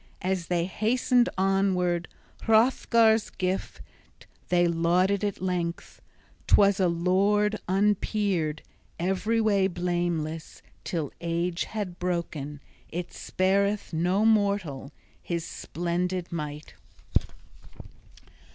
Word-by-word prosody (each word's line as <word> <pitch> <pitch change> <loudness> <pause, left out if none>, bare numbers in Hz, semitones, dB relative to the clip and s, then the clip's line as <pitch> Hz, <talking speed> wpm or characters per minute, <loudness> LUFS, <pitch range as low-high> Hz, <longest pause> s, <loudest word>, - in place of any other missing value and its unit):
As 185 -2 -1
they 170 -1 +1
hastened 240 +5 +2
onward, 185 -2 +1 0.4
Hrothgar's 225 -1 +4
gift 185 +1 -3 0.7
they 175 -1 +4
lauded 175 +4 +2
at 200 -2 -2
length. 175 -2 -3 0.5
'Twas 200 -1 +5
a 185 - +4
lord 200 +5 +2
unpeered, 195 -5 +1 0.4
every 195 +6 0
way 200 -3 +3
blameless, 175 -3 -3 0.2
till 160 -5 -3
age 170 +1 -1
had 200 -5 -5
broken 160 -5 -3 0.3
it 175 +1 -5
spareth 200 +1 0
no 180 +6 +1
mortal 200 -11 +1 0.3
his 170 -1 -3
splendid 175 +1 -3
might. 150 -2 -5
180 Hz, 90 wpm, -27 LUFS, 170-200 Hz, 0.7 s, Twas